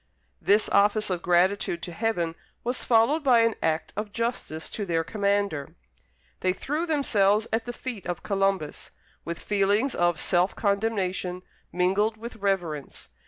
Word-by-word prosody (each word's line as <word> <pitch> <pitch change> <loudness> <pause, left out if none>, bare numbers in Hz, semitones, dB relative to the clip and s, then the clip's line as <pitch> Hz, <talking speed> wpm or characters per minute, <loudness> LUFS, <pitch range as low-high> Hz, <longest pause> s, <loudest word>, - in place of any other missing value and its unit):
This 210 +2 +3
office 210 0 +3
of 175 -2 -1
gratitude 175 0 +2
to 175 - -4
Heaven 175 -3 -1 0.3
was 245 +2 -2
followed 245 +7 +3
by 250 -4 +5
an 230 0 +3
act 160 0 -1
of 210 0 -4
justice 230 -9 -3
to 210 - -4
their 165 -4 0
commander. 200 -6 -1 0.6
They 185 0 +1
threw 300 - -2
themselves 215 -9 +2
at 225 0 0
the 240 - -3
feet 240 -6 -6
of 175 -1 -4
Columbus, 195 -6 -1 0.3
with 170 0 -4
feelings 205 +6 +1
of 175 -2 +1
self 180 +2 +1
condemnation, 195 -3 -1 0.3
mingled 195 +5 +1
with 230 +1 -8
reverence. 175 -8 -2
200 Hz, 145 wpm, -26 LUFS, 180-225 Hz, 0.6 s, by